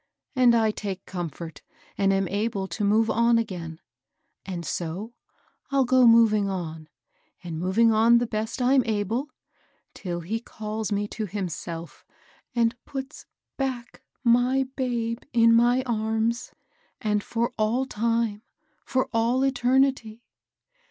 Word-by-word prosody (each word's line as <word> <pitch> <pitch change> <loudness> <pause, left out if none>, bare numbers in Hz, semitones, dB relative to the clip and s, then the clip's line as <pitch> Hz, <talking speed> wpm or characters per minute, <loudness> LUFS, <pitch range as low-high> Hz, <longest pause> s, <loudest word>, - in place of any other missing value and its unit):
And 250 -2 +5
I 220 -2 +3
take 195 -3 -6
comfort, 170 -3 -6 0.3
and 195 -1 +2
am 195 -1 +1
able 200 0 -2
to 180 +3 -4
move 215 +2 +3
on 235 0 +3
again; 175 -8 -4 0.7
and 175 -3 -5
so 180 +9 -4 0.6
I'll 275 -1 +2
go 255 0 +5
moving 220 -3 +5
on, 160 -4 -5 0.5
and 165 -2 -5
moving 205 +6 +3
on 230 +2 +5
the 240 - +1
best 220 +3 -3
I'm 260 +2 +5
able, 220 +6 -1 0.6
till 175 -2 -5
he 215 +7 -3
calls 220 -2 -5
me 205 0 0
to 220 -2 -4
himself, 170 -3 -6 0.5
and 235 0 +2
put^ 270 +1 -7 0.3
back 255 -3 -4 0.2
my 245 +2 +3
babe 235 -3 -1
in 230 -1 +5
my 240 +2 +4
arms, 225 0 -1 0.5
^and 210 -1 0
for 235 +3 -2
all 230 +5 +1
time, 230 -3 -1 0.2
— - - -43
for 260 0 +1
all 235 +3 +2
eternity." 255 -3 +1
225 Hz, 130 wpm, -25 LUFS, 195-240 Hz, 0.7 s, And